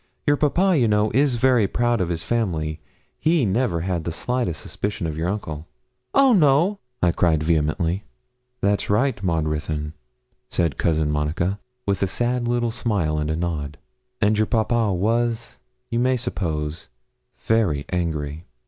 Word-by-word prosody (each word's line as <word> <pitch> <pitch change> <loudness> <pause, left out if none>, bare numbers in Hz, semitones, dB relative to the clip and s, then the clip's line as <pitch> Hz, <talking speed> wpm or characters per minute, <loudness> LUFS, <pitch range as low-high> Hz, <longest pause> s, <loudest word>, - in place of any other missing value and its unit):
Your 145 - +4
papa, 175 +6 +2
you 120 - +3
know, 105 0 +2
is 135 +1 +3
very 120 -3 +3
proud 120 +1 +1
of 85 - 0
his 85 -2 -2
family 80 -9 -1 0.4
he 160 -5 +3
never 100 -4 +1
had 90 -2 -2
the 85 - -3
slightest 120 -2 -2
suspicion 105 -2 -4
of 80 -2 -3
your 80 +3 -1
uncle.' 80 -6 -4 0.5
'Oh 270 -2 +6
no!' 170 +3 +4 0.2
I 90 - +5
cried 80 -2 +2
vehemently. 80 +3 0 0.6
'That's 100 0 +1
right, 110 +2 +1
Maud 85 -4 0
Ruthyn,' 75 0 -3 0.6
said 85 -4 0
Cousin 80 -2 +1
Monica, 80 +6 -1 0.3
with 100 -1 0
a 100 - +2
sad 120 +4 0
little 120 -1 +1
smile 100 -10 0
and 75 0 -2
a 80 - 0
nod. 80 -4 -3 0.4
'And 105 0 +2
your 110 - +2
papa 115 -2 +1
was, 115 +5 -1 0.3
you 115 - +1
may 130 +1 +2
suppose, 80 -9 -3 0.6
very 95 -11 +2
angry.' 80 -3 -2
100 Hz, 155 wpm, -23 LUFS, 80-120 Hz, 0.6 s, Oh